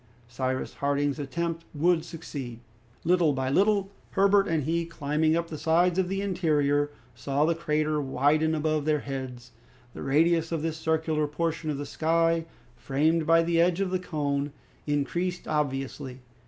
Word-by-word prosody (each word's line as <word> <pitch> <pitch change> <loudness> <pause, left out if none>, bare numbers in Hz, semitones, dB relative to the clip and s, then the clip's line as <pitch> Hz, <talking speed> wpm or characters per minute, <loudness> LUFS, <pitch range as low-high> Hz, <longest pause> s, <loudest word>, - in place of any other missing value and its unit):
Cyrus 130 +2 -3
Harding's 145 +1 0
attempt 165 +4 -3
would 165 +2 +2
succeed. 135 -8 -7 0.4
Little 170 -3 +3
by 130 0 -1
little, 200 +3 +2 0.2
Herbert 200 0 +4
and 160 -3 0
he 165 +4 0
climbing 155 -1 0
up 170 0 -1
the 155 - -5
sides 175 +3 +3
of 185 -1 +1
the 195 +1 -1
interior, 145 -6 +1 0.2
saw 140 +5 0
the 170 - +2
crater 155 -2 0
widen 145 +4 +2
above 155 -1 0
their 155 -2 +1
heads. 130 -3 -6 0.4
The - - -8
radius 165 +4 +2
of 160 -2 -2
this 160 -1 -2
circular 160 -1 0
portion 160 +1 -2
of 145 - -1
the 145 - -4
sky, 165 +2 +1 0.3
framed 155 +5 +1
by 165 0 +5
the 165 0 +2
edge 175 +1 +2
of 195 -2 0
the 185 - 0
cone, 145 -4 -2 0.4
increased 175 +5 -1
obviously. 135 -3 -2
155 Hz, 155 wpm, -27 LUFS, 145-170 Hz, 0.4 s, by